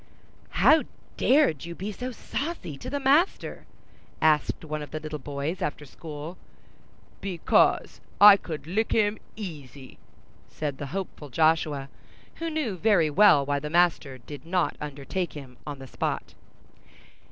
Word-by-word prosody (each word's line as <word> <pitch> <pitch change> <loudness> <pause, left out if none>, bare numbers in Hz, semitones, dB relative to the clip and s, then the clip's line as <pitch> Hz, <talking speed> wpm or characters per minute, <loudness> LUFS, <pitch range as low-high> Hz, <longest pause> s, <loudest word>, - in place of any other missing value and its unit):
"How 315 0 +8 0.3
dared 265 - +3
you 170 0 -7
be 195 +5 -4
so 250 +5 -5
saucy 255 - -5
to 135 - -8
the 285 - -2
master?" 285 +7 +1 0.5
asked 155 0 +2
one 155 0 -4
of 150 - -7
the 155 - -4
little 155 -1 -6
boys, 145 +5 -4
after 150 0 -3
school. 155 +4 -9 0.8
"Because 185 -4 +2 0.2
I 205 0 +11
could 160 -6 -6
lick 210 +7 0
him, 210 -1 +2 0.2
easy," 145 - -9 0.5
said 145 -3 -4
the 145 - -4
hopeful 175 -3 -6
Joshua, 155 -1 +2 0.5
who 330 0 -3
knew 295 - -2
very 180 -6 +3
well 150 -4 +6
why 145 0 0
the 150 +1 -5
master 165 -5 +2
did 135 +2 -10
not 175 +1 0
undertake 150 +5 -4
him 135 -4 -10
on 145 -1 -5
the 135 - -10
spot. 130 - -3
160 Hz, 140 wpm, -26 LUFS, 145-205 Hz, 0.8 s, I